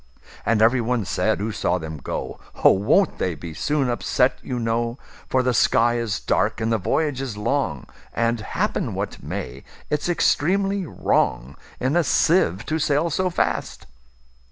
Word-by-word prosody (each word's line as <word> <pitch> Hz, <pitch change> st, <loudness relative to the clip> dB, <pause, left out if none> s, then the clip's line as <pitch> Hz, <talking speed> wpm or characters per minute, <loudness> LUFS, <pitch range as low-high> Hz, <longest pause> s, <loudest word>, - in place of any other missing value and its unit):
And 110 Hz, -1 st, +3 dB
every 120 Hz, +2 st, +4 dB
one 115 Hz, -2 st, -1 dB
said -, -, 0 dB
who 105 Hz, +3 st, -3 dB
saw 90 Hz, -3 st, 0 dB
them 80 Hz, -2 st, -6 dB
go,"Oh! -, -, 0 dB
won't 110 Hz, -, +2 dB
they 90 Hz, -3 st, -1 dB
be 80 Hz, +2 st, -8 dB
soon 145 Hz, -, 0 dB
upset, 125 Hz, +1 st, +1 dB
you 125 Hz, -, -4 dB
know:For 120 Hz, +2 st, -2 dB
the 125 Hz, 0 st, +1 dB
sky 120 Hz, +1 st, +3 dB
is 115 Hz, -4 st, -2 dB
dark, 105 Hz, +5 st, 0 dB
and 110 Hz, 0 st, -1 dB
the 110 Hz, -, +1 dB
voyage 135 Hz, -, 0 dB
is 125 Hz, -6 st, -5 dB
long; 115 Hz, -, -1 dB, 0.3 s
And, 115 Hz, 0 st, 0 dB
happen 110 Hz, -, -2 dB
what -, -, -4 dB
may, 65 Hz, +2 st, -6 dB, 0.3 s
it 150 Hz, -1 st, +1 dB
's -, -, -3 dB
extremely 195 Hz, +4 st, +1 dB
wrongIn 100 Hz, -, -1 dB
a 175 Hz, -, +4 dB
sieve 125 Hz, -, +2 dB
to 160 Hz, +1 st, -1 dB
sail 155 Hz, +2 st, +1 dB
so 185 Hz, +4 st, +1 dB
fast." 175 Hz, -, -2 dB
120 Hz, 155 wpm, -23 LUFS, 105-145 Hz, 0.3 s, every